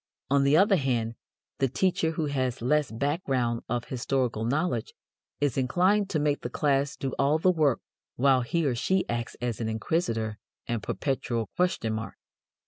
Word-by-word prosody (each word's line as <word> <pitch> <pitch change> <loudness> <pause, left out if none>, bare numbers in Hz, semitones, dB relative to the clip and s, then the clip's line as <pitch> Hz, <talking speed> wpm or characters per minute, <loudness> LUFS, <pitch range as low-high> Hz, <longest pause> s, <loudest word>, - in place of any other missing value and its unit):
On 140 0 +4
the 140 +2 +5
other 195 +1 +5
hand, 120 -6 0 0.5
the 135 - +3
teacher 165 +3 +1
who 160 -1 -1
has 130 -4 -1
less 150 +2 +2
background 130 -2 -1
of 120 0 -1
historical 125 -3 -1
knowledge 135 -1 -1 0.4
is 140 -2 +1
inclined 185 +10 +2
to 160 - 0
make 145 -1 +1
the - - -4
class 140 -1 +1
do 135 -1 -3
all 140 +3 +3
the 185 +3 +4
work 150 -7 +2 0.3
while 130 0 +4
he 160 +6 0
or 135 - +2
she 185 +10 0
acts 120 0 -3
as 120 -2 -2
inquisitor 110 -1 -1 0.3
and 120 -3 -2
perpetual 120 -4 -2
question 180 -11 0
mark. 110 +1 -5
135 Hz, 160 wpm, -27 LUFS, 120-155 Hz, 0.5 s, the